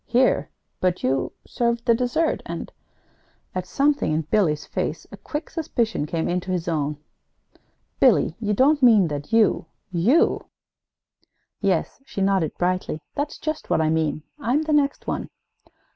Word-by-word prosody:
"Here? 255 Hz, +2 st, +2 dB, 0.3 s
But 185 Hz, -1 st, 0 dB
you 135 Hz, +1 st, 0 dB
served 235 Hz, -1 st, -1 dB
the 235 Hz, -, +5 dB
dessert, 250 Hz, +7 st, 0 dB
and -, -, -5 dB, 0.4 s
" -, -, -39 dB
At 185 Hz, 0 st, -3 dB
something 285 Hz, -, +1 dB
in 155 Hz, +1 st, +1 dB
Billy's 155 Hz, -3 st, +1 dB
face, -, -, -3 dB
a -, -, -9 dB
quick 300 Hz, +1 st, -5 dB
suspicion 230 Hz, -, -1 dB
came 165 Hz, +1 st, -1 dB
into 180 Hz, +1 st, -2 dB
his 180 Hz, -2 st, -1 dB
own. 150 Hz, -3 st, -1 dB, 1.0 s
"Billy, 160 Hz, -, +4 dB
you 210 Hz, -2 st, 0 dB
don't 285 Hz, +6 st, +4 dB
mean 215 Hz, -8 st, +6 dB
that 145 Hz, +5 st, -5 dB
you 220 Hz, -6 st, +3 dB, 0.2 s
you 200 Hz, -, +2 dB, 0.5 s
" -, -, -47 dB
"Yes," 180 Hz, -, -2 dB
she 235 Hz, -, -7 dB
nodded 190 Hz, -5 st, +1 dB
brightly, 180 Hz, -3 st, -1 dB
"that's 290 Hz, +1 st, -3 dB
just 310 Hz, 0 st, -4 dB
what -, -, +2 dB
I 155 Hz, -1 st, +2 dB
mean. 155 Hz, -2 st, 0 dB, 0.2 s
I'm 285 Hz, +3 st, +1 dB
the 310 Hz, -1 st, -1 dB
next 285 Hz, -1 st, +1 dB
one." -, -, -3 dB
195 Hz, 155 wpm, -23 LUFS, 160-260 Hz, 1.0 s, mean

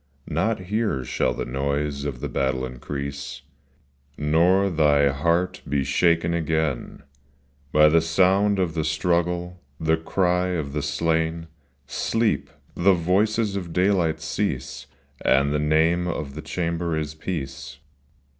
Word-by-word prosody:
Not 95 Hz, +7 st, 0 dB
here 105 Hz, -, -1 dB
shall 65 Hz, -1 st, 0 dB
the -, -, -3 dB
noise 70 Hz, +2 st, -2 dB
of 65 Hz, -4 st, -4 dB
the -, -, -2 dB
battle 65 Hz, -1 st, -1 dB
increase 70 Hz, +2 st, -6 dB, 0.7 s
Nor 85 Hz, +6 st, +3 dB
thy 75 Hz, -3 st, +4 dB
heart 85 Hz, +6 st, 0 dB
be 70 Hz, -1 st, +1 dB
shaken 85 Hz, +4 st, +2 dB
again 80 Hz, -5 st, -1 dB, 0.7 s
By 75 Hz, 0 st, +6 dB
the 80 Hz, +2 st, +4 dB
sound 95 Hz, +5 st, +3 dB
of 90 Hz, -4 st, 0 dB
the 80 Hz, -1 st, -1 dB
struggle, 85 Hz, +3 st, -1 dB, 0.2 s
the 80 Hz, 0 st, +2 dB
cry 90 Hz, +2 st, +1 dB
of 80 Hz, -6 st, -3 dB
the 75 Hz, -, -1 dB
slain: 80 Hz, +2 st, -1 dB, 0.2 s
— 70 Hz, +1 st, -41 dB
Sleep! 110 Hz, -6 st, 0 dB, 0.2 s
— -, -, -32 dB
the 100 Hz, -1 st, +7 dB
voices 100 Hz, +5 st, +1 dB
of 90 Hz, -4 st, -5 dB
daylight 90 Hz, -4 st, +2 dB
cease, 80 Hz, -2 st, -3 dB, 0.4 s
And 70 Hz, +2 st, +3 dB
the 75 Hz, -, +1 dB
name 80 Hz, +4 st, +2 dB
of 75 Hz, -5 st, -4 dB
the 75 Hz, -, -6 dB
chamber 85 Hz, -1 st, -2 dB
is 75 Hz, -1 st, -3 dB
peace. 70 Hz, -4 st, -6 dB
80 Hz, 135 wpm, -24 LUFS, 70-90 Hz, 0.7 s, the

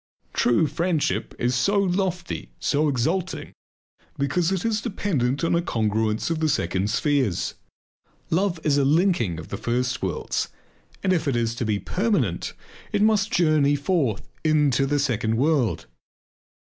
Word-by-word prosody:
True 120 Hz, +6 st, +3 dB
friendship 165 Hz, 0 st, -1 dB
is 125 Hz, +1 st, 0 dB
so 200 Hz, +11 st, +2 dB
lofty, 180 Hz, -, -1 dB
so 150 Hz, +1 st, +1 dB
exalting, 160 Hz, +8 st, -1 dB, 0.6 s
because 160 Hz, +6 st, +1 dB
it 190 Hz, 0 st, -1 dB
is 220 Hz, -2 st, +1 dB
dependent 155 Hz, -, -1 dB
upon 165 Hz, -, +2 dB
a 170 Hz, -, +3 dB
congruence 110 Hz, -, 0 dB
of 165 Hz, -, -1 dB
the 160 Hz, -1 st, +1 dB
second 95 Hz, -, 0 dB
spheres. 130 Hz, -, 0 dB, 0.8 s
Love 180 Hz, 0 st, +1 dB
is 145 Hz, -2 st, +3 dB
a -, -, +3 dB
linking 145 Hz, -, +2 dB
of 80 Hz, -, -9 dB
the -, -, -4 dB
first 125 Hz, +2 st, -1 dB
worlds 95 Hz, -5 st, -2 dB, 0.5 s
and 190 Hz, -1 st, +3 dB
if 165 Hz, -4 st, 0 dB
it 135 Hz, -, +1 dB
is 115 Hz, -1 st, 0 dB
to 120 Hz, 0 st, -3 dB
be 105 Hz, -1 st, +1 dB
permanent 145 Hz, -, -1 dB, 0.4 s
it 205 Hz, -, +2 dB
must 215 Hz, 0 st, +3 dB
journey 155 Hz, -9 st, +3 dB
forth 140 Hz, -, 0 dB, 0.2 s
into 145 Hz, -4 st, +3 dB
the 145 Hz, +1 st, +1 dB
second 115 Hz, -5 st, 0 dB
world. 140 Hz, -4 st, +1 dB
145 Hz, 150 wpm, -24 LUFS, 120-175 Hz, 0.8 s, True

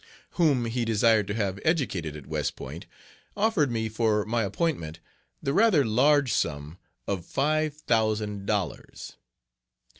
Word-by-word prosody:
whom 145 Hz, -8 st, +2 dB
he 120 Hz, +1 st, -1 dB
desired 110 Hz, -2 st, +3 dB
to 100 Hz, -, -3 dB
have 100 Hz, -3 st, -2 dB
educated 100 Hz, -, -1 dB
at 75 Hz, -3 st, -10 dB
West -, -, -2 dB
Point, -, -, -9 dB, 0.5 s
offered 205 Hz, -, +2 dB
me 110 Hz, -1 st, -1 dB
for 110 Hz, -1 st, +1 dB
my 115 Hz, +2 st, 0 dB
appointment 100 Hz, -, -2 dB, 0.4 s
the 140 Hz, -, 0 dB
rather 195 Hz, -, +4 dB
large 135 Hz, +4 st, +3 dB
sum 75 Hz, +2 st, -2 dB, 0.3 s
of 95 Hz, -4 st, -2 dB
five 155 Hz, -, 0 dB
thousand 110 Hz, -6 st, -1 dB
dollars. 100 Hz, -6 st, -4 dB
115 Hz, 130 wpm, -27 LUFS, 100-145 Hz, 0.5 s, rather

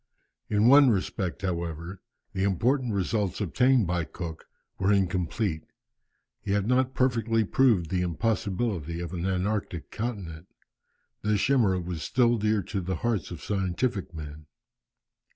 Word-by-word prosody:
In 105 Hz, +2 st, +3 dB
one 140 Hz, +1 st, +8 dB
respect, 95 Hz, -2 st, -2 dB
however, 85 Hz, 0 st, -4 dB, 0.3 s
the 95 Hz, -, -2 dB
important 120 Hz, +7 st, +1 dB
results 100 Hz, -1 st, -1 dB
obtained 125 Hz, +4 st, +3 dB
by 90 Hz, -1 st, 0 dB
Cook 80 Hz, 0 st, -7 dB, 0.3 s
were 95 Hz, +1 st, +2 dB
incomplete. 95 Hz, -2 st, 0 dB, 0.8 s
He 100 Hz, -, -2 dB
had 100 Hz, -1 st, +1 dB
not 130 Hz, +2 st, +1 dB
perfectly 115 Hz, -3 st, +2 dB
proved 105 Hz, -, +2 dB
the 90 Hz, -1 st, +1 dB
impossibility 95 Hz, -2 st, -1 dB
of 85 Hz, +1 st, -5 dB
an 90 Hz, +1 st, -2 dB
antarctic 95 Hz, -2 st, -2 dB
continent. 95 Hz, -8 st, -5 dB, 0.7 s
This 105 Hz, -1 st, +1 dB
chimera 115 Hz, -9 st, +3 dB
was 85 Hz, -2 st, -5 dB
still 120 Hz, +2 st, +2 dB
dear 105 Hz, -1 st, +1 dB
to 100 Hz, +2 st, -3 dB
the 90 Hz, +1 st, -2 dB
hearts 110 Hz, -8 st, 0 dB
of -, -, -8 dB
scientific 95 Hz, +1 st, -1 dB
men. 75 Hz, -2 st, -9 dB
100 Hz, 135 wpm, -27 LUFS, 90-115 Hz, 0.8 s, one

